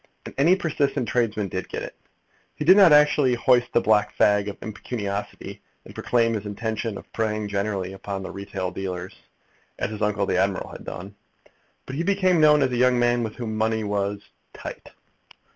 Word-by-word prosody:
And - - -8
any 165 +6 +5
persistent 145 - -1
tradesman 110 -4 0
did 95 +1 -5
get - - -4
it. - - -8 0.6
He 150 - -4
did 185 +4 +8
not 195 -5 +7
actually 150 -3 +5
hoist 125 0 +2
the 120 - +3
black 105 0 +2
flag 105 0 +3
of 100 - -5
impecuniosity, 105 -2 -5 0.2
and - - -12
proclaim 115 -1 +1
his 105 -2 -4
intention 110 +1 -3
of - - -14
preying 110 -1 -1
generally 100 -2 -2
upon 95 0 -6
the - - -6
retail 95 -2 -5
dealers, 90 -1 -5 0.6
as - - -2
his 105 0 -7
uncle 105 -1 +1
the 90 - 0
admiral 95 0 -1
had - - -10
done. 95 +3 -7 0.7
But 130 - -6
he - - 0
became 185 -2 +2
known 150 -1 +6
as 130 - 0
a 125 - -1
young 125 0 +4
man 120 0 +2
with 110 -2 -4
whom 115 -3 -4
money 110 0 0
was 100 0 -2 0.3
"tight." - - -8
110 Hz, 185 wpm, -24 LUFS, 100-125 Hz, 0.7 s, did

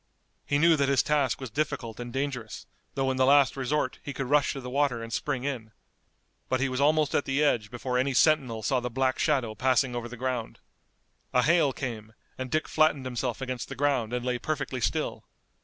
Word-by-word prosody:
He 145 - +2
knew 165 +2 +5
that 140 -1 +2
his 140 -2 +3
task 145 -4 +1
was 130 -4 -7
difficult 120 -4 -3
and 120 0 -6
dangerous, 130 -4 -4 0.3
though 135 -1 +1
in 130 - -2
the 130 - +4
last 140 -1 +5
resort 140 +3 -1
he 140 - -6
could 135 - -3
rush 145 +1 +3
to 135 - -6
the 125 - -8
water 135 -4 +1
and 115 0 -7
spring 135 -1 -2
in. 120 -6 -4 0.8
But 130 - +1
he 135 +1 +1
was 130 +1 -2
almost 155 0 +3
at - - +1
the 135 +2 +1
edge 115 -8 +1
before 125 +1 -2
any 130 +1 0
sentinel 130 -8 +3
saw 130 +3 +1
the 125 0 -3
black 130 +2 0
shadow 130 -8 +1
passing 130 +1 +1
over 120 0 -4
the 125 - -9
ground. 125 -2 -3 0.8
A 125 - +4
hail 160 -2 +4
came, 110 -5 -6 0.2
and 130 0 -5
Dick 155 +4 0
flattened 155 -4 +2
himself 125 -1 -3
against 130 -3 -4
the - - -6
ground 130 -5 0
and 125 0 -2
lay 125 -1 -1
perfectly 140 -3 -3
still. - - -1
130 Hz, 210 wpm, -28 LUFS, 125-140 Hz, 0.8 s, knew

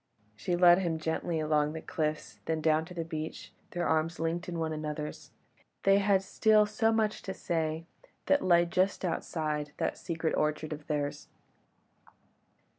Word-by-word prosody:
She 175 - -1
led 175 0 +7
him 170 -4 -1
gently 160 +1 -2
along 150 -1 +1
the 160 - -4
cliffs, 150 -9 -3
then 160 -1 0
down 155 0 +2
to 180 +1 -11
the 165 -1 -3
beach; 160 -1 -6 0.2
their 175 0 -2
arms 160 +1 +1
linked 170 +2 -2
in 170 - -4
one 160 -1 -1
another's, 150 0 -5 0.5
they 195 0 +5
had 195 -1 +3
still 215 +2 +4
so 225 +2 +1
much 220 -1 +1
to 190 - -5
say 160 -1 -2 0.4
that 285 0 +3
lay 175 -1 +5
just 185 +3 0
outside 155 -3 -2
that - - -1
secret 165 -1 -2
orchard 150 +1 0
of 150 0 -10
theirs. 145 -2 -2
165 Hz, 160 wpm, -30 LUFS, 155-180 Hz, 0.5 s, led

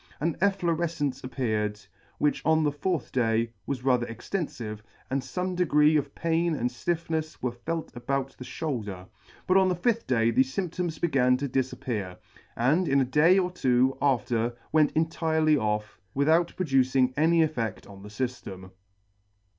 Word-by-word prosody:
An 165 +2 0
efflorefcence 170 -7 0
appeared, 110 -5 -2 0.4
which 150 - 0
on 160 0 +3
the 150 - +2
fourth 150 +1 -2
day 115 -2 +1
was 130 -3 -3
rather 125 -2 +2
extenfive, 115 - -5 0.3
and 135 +1 +1
fome 180 +8 -3
degree 155 -3 +4
of 145 -2 -1
pain 165 0 +1
and 125 -3 -1
ftiffnefs 160 +4 -3
were 125 - 0
felt 160 +7 -5
about 135 +2 -2
the - - -6
fhoulder; 105 - -4 0.4
but 185 - +4
on 190 -1 +4
the 180 - +1
fifth 230 +6 0
day 115 -2 +2
thefe 130 +3 +1
fymp 185 -4 -1
toms 175 -3 -3
began 125 -6 +2
to 140 +2 -2
difappear, 120 -7 -3 0.4
and 150 +10 +2
in 140 -1 +3
a 135 - +3
day 150 +8 +4
or 180 -2 +1
two 130 -5 +2
after 120 -3 +1
went 155 -2 +4
entirely 160 -1 +2
off, 105 -5 -2 0.2
without 160 +5 +3
producing 130 -5 +2
any 165 +2 +4
effedt 115 -9 -4
on 100 -1 -12
the 105 - -10
fyftem. 105 -5 -5
135 Hz, 155 wpm, -27 LUFS, 120-165 Hz, 0.4 s, degree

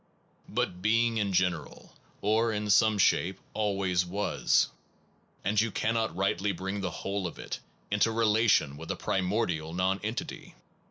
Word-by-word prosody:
But 90 0 -2
being 115 +2 +2
in 100 -2 0
general, 90 -1 -1 0.3
or 110 +3 +2
in 105 -1 -1
some 110 0 +5
shape, 95 -1 +2
always 95 -4 +1
was, 85 -10 +1 0.7
and 105 +1 +2
you 115 - 0
cannot 110 +1 -1
rightly 95 +1 +1
bring 95 +3 -4
the 95 - -1
whole 95 +3 -3
of 85 - -9
it - - -5 0.3
into 105 +2 +3
relation 110 -9 +3
with 80 +2 -9
a - - -1
primordial 90 -5 -1
non 95 +2 +1
entity. 110 +3 -5
100 Hz, 145 wpm, -29 LUFS, 90-110 Hz, 0.7 s, some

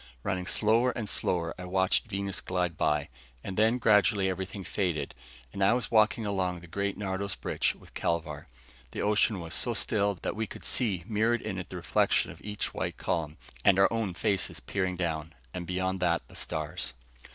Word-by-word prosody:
Running 90 0 -1
slower 115 +4 +3
and 115 -3 -3
slower, 85 -4 0
I 90 - -5
watched 95 +3 +2
Venus 100 -1 -2
glide 90 -2 -1
by. 75 0 +1 0.3
And 95 - -4
then, 110 +4 +4
gradually, 105 -4 +4
everything 95 +1 -5
faded, 85 -8 -1 0.4
and 100 - 0
I 95 - +6
was 120 -4 -1
walking 110 0 +4
along 90 -3 -1
the - - -11
great 100 +3 -2
Nardos 100 -1 -2
bridge - - 0
with - - -17
Kelvar. 80 -3 -2 0.5
The - - -2
ocean 105 -1 +3
was 85 -1 -5
so - - +2
still 100 -1 +2
that - - -1
we 110 0 -2
could - - -10
see 100 -9 0
mirrored 115 +2 +1
in 95 -3 -3
it 90 - -7
the - - -7
reflection 85 -1 +2
of - - -13
each 105 0 -3
white - - -3
column, 80 -3 -2 0.3
and 100 -2 +6
our 95 +3 +5
own 110 -6 -1
faces 100 +1 0
peering 95 -2 -1
down, 80 -2 -2 0.2
and 90 -1 -5
beyond 95 +1 -1
that 85 -2 +1
the - - -15
stars. 75 -5 -3
95 Hz, 185 wpm, -29 LUFS, 90-105 Hz, 0.5 s, I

